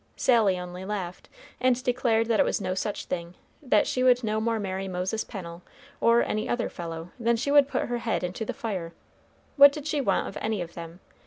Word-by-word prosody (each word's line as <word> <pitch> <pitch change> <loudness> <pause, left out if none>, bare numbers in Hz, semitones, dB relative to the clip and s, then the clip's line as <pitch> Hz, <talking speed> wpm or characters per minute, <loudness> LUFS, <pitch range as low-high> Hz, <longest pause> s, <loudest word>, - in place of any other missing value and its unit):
Sally 220 -7 +3
only 180 +1 -7
laughed, 190 -3 -5 0.3
and 255 -1 +2
declared 245 -3 +2
that 225 -2 +1
it - - +7
was - - 0
no 185 -2 -2
such 200 +2 -3
thing; 170 0 -5 0.3
that 250 -7 +3
she 255 - -1
would 250 -1 +4
no 215 0 0
more 230 0 0
marry 195 -1 -3
Moses 185 +4 -2
Pennel, 170 -5 -8 0.4
or 235 +1 +4
any 215 0 -2
other 240 -1 -1
fellow, 165 0 -7
than 235 0 +2
she 260 +5 -1
would 285 -1 +6
put - - -1
her 240 0 -2
head 230 -4 -1
into 180 +5 -3
the - - -3
fire. 185 -7 -4 0.6
What 285 0 +10
did 290 0 -7
she 300 -2 0
want 195 -7 +1
of - - -6
any 215 -1 -1
of 170 -1 -5
them? 170 +2 -9
215 Hz, 215 wpm, -27 LUFS, 180-240 Hz, 0.6 s, What